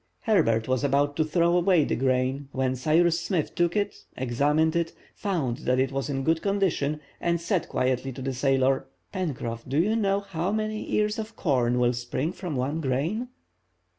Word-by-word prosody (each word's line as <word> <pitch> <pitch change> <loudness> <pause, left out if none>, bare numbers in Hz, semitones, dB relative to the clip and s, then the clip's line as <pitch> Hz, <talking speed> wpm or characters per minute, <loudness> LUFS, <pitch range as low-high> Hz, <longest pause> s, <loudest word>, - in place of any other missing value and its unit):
Herbert 150 - +2
was 130 +1 0
about 140 +1 +2
to 160 - +3
throw 170 +2 +2
away 175 -2 +4
the - - 0
grain, 130 +2 0
when 130 0 0
Cyrus 165 +5 +2
Smith 170 -3 -1
took 175 0 +1
it, 205 -1 -1
examined 145 +6 +1
it, 170 -1 0 0.2
found 160 - -2
that 125 0 0
it 130 0 +1
was 135 +1 -2
in 135 -1 -2
good 160 +2 +2
condition, 185 -7 0 0.2
and 170 0 0
said 170 +1 -1
quietly 130 +1 0
to 130 - -8
the 135 0 -2
sailor:— 135 0 +2 0.3
"Pencroff, 130 - -3
do 135 - 0
you 205 +7 +3
know 200 -3 +1
how 185 -2 -3
many 215 0 -2
ears 210 +1 +1
of 220 0 -6
corn 125 -7 +1
will 125 0 +3
spring 125 +6 -2
from 180 -4 -5
one 140 +6 -1
grain?" 160 - -1
150 Hz, 180 wpm, -26 LUFS, 130-175 Hz, 0.3 s, away